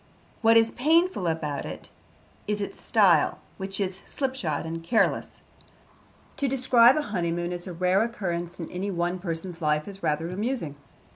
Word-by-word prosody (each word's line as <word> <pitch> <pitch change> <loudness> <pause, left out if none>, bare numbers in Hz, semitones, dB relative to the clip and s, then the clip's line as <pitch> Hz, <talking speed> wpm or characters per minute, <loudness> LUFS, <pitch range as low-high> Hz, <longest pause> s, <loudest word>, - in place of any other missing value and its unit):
What 225 0 +6
is 225 0 +4
painful 320 - +2
about 155 -3 -2
it - - -8 0.6
is 210 0 -1
its 200 - -5
style, 185 -9 +4 0.2
which 195 +1 -3
is 190 -1 -2
slipshod 260 - -2
and 165 0 -5
careless. 220 +6 +1 1.0
To 280 - 0
describe 255 -1 +5
a 305 - +1
honeymoon 175 -5 -2
as 175 +1 -5
a 180 - -5
rare 180 +3 +2
occurrence 180 -7 -3
in 165 - -4
any 190 +3 -3
one 175 0 -1
person's 170 -1 -5
life 150 -1 +1
is 195 -1 -7
rather 160 +3 -1
amusing. 205 - -2
185 Hz, 155 wpm, -26 LUFS, 170-230 Hz, 1.0 s, What